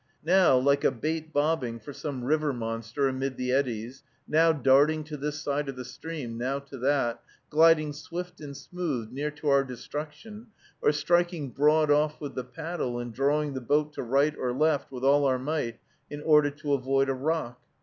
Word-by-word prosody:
Now 180 -5 +5
like 140 +2 +2
a - - +5
bait 160 +5 -3
bobbing 145 -6 0
for 140 +6 -9
some 135 -4 -5
river 150 +2 +1
monster, 115 +2 -2
amid 135 0 -2
the 125 0 -1
eddies, 125 -2 -1 0.3
now 165 +2 +4
darting 145 +2 +3
to 150 0 -7
this 150 +1 -4
side 145 0 -2
of 135 - -5
the 125 0 -7
stream, 130 -4 -6
now 130 +3 -1
to 140 -1 -10
that, 130 -3 +1 0.3
gliding 155 -1 +5
swift 175 +4 -7
and 140 -2 -8
smooth 145 -11 -4
near 145 +4 -2
to 150 0 -4
our 140 0 +5
destruction, 150 - -8 0.3
or - - +4
striking 170 -2 0
broad 150 +2 +3
off 150 +1 +2
with 145 -3 -6
the 130 - -4
paddle 125 0 -4
and 120 -1 -5
drawing 145 +3 +1
the 130 - -4
boat 150 +4 +1
to - - -5
right 140 +5 +2
or 125 - -2
left 150 +1 +1
with 130 -1 -7
all 140 +1 +4
our 130 -1 +2
might, 130 -4 -3 0.3
in 145 0 -7
order 150 -2 +5
to 145 0 -3
avoid 135 0 +1
a 135 - +1
rock. 130 -3 -2
145 Hz, 190 wpm, -27 LUFS, 130-155 Hz, 0.3 s, Now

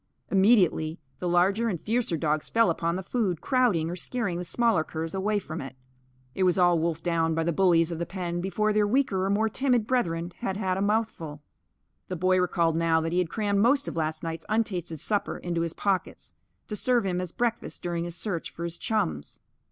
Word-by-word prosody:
Immediately 190 -6 +3 0.2
the 180 - -2
larger 195 +6 +3
and 180 -6 -2
fiercer 220 -5 0
dogs 155 -1 -1
fell 230 -6 +4
upon 170 +1 -1
the 190 - -4
food, 190 -5 -1
crowding 235 -11 +2
or 175 - -3
scaring 185 -1 -3
the - - -3
smaller 220 -1 +2
curs 160 +1 -5
away 205 +2 0
from 170 -4 -5
it. 135 -1 -8 0.6
It - - -4
was 180 -1 +3
all 175 -2 +4
wolfed 165 0 -1
down 165 -2 +1
by 165 - +1
the 170 - +1
bullies 175 -2 +3
of 165 - -4
the 170 - -1
pen 175 -2 -3
before 210 +3 0
their 210 -1 +3
weaker 210 -5 +1
or 195 - 0
more 210 +2 +2
timid 245 0 +1
brethren 175 -9 0
had 195 -5 -3
had 190 -3 0
a 190 - -2
mouthful. 200 -8 -1 0.6
The 185 - -4
boy 185 +2 +2
recalled 170 -2 +1
now 165 -1 +3
that 165 +1 -2
he 175 - +1
had 180 -3 0
crammed 205 -1 0
most 270 +6 +3
of - - -4
last 155 0 -2
night's 165 -1 -5
untasted 185 -8 -1
supper 205 +6 -1
into 170 -1 -2
his 165 -1 -2
pockets, 195 -2 -2 0.3
to 210 - -4
serve 240 0 +2
him 180 -1 -1
as 180 -2 -5
breakfast 235 +2 -2
during 170 -1 -2
his 170 -1 -6
search 175 -2 -3
for 170 - -8
his 170 0 -4
chums. 80 - -2
180 Hz, 210 wpm, -27 LUFS, 165-210 Hz, 0.6 s, fell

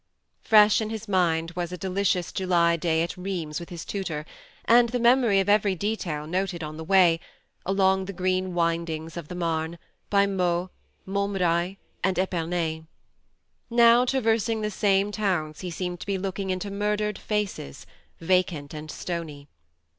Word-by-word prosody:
Fresh 215 0 +5
in 215 - -2
his 220 0 -6
mind 165 -4 +1
was 175 -1 -4
a 180 - -5
delicious 185 0 0
July 175 -3 +2
day 165 0 +1
at 170 - -4
Rheims 180 -5 -4
with 170 - -9
his 170 -3 -7
tutor, 165 -7 -4 0.4
and 235 0 +5
the 245 - -1
memory 235 -4 +4
of 195 - 0
every 205 -2 +3
detail 180 -6 -3
noted 180 +1 -2
on 155 0 -6
the 160 - -6
way, 175 -2 +4 0.5
along 190 0 +2
the 200 - -5
green 185 0 -1
windings 165 -1 -1
of 170 -4 -6
the 180 - -7
Marne, 165 -1 -2 0.3
by 200 -1 +4
Meaux, 180 -2 0 0.3
Montmirail 190 -2 0 0.3
and 190 -2 +1
Epernay. 170 -3 -1 0.8
Now, 235 0 +6
traversing 230 -3 +1
the 210 0 -2
same 200 0 +2
towns, 180 -8 -1
he 180 - -5
seemed 180 +1 -4
to - - -9
be 200 -1 0
looking 195 0 -4
into 185 +2 -2
murdered 210 +1 -1
faces, 210 - -3 0.3
vacant 170 -4 0
and 155 0 -7
stony. 155 -5 -6
185 Hz, 155 wpm, -26 LUFS, 170-200 Hz, 0.8 s, Now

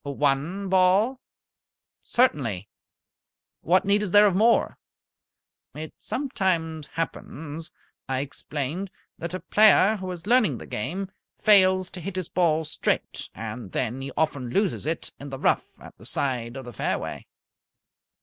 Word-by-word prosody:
"One 145 +7 0
ball?" 190 +7 +3 0.8
"Certainly. 120 - +1 0.9
What 185 +3 +3
need 200 +1 +3
is 210 - -1
there 205 +3 +7
of 195 -3 +3
more?" 225 +4 +3 1.0
"It 155 +1 -7
sometimes 175 - -1
happens," 160 -1 -5 0.4
I 130 0 0
explained, 145 +5 -4 0.3
"that 170 +2 -4
a - - -3
player 215 0 +5
who 185 -1 -6
is 175 -1 -6
learning 220 - +3
the - - -9
game 190 - -4 0.3
fails 185 -3 +5
to 185 - -8
hit 190 +3 -5
his 185 -3 -3
ball 165 -3 +2
straight, 155 - -2
and 110 -2 -7
then 125 +1 -2
he 135 +1 -5
often 140 -6 0
loses 195 - 0
it 165 +1 -2
in 140 - -8
the 135 - -5
rough - - 0
at - - -13
the - - -10
side 125 -2 -1
of 135 - -7
the 120 - -9
fairway." - - -3
165 Hz, 140 wpm, -25 LUFS, 140-195 Hz, 1.0 s, there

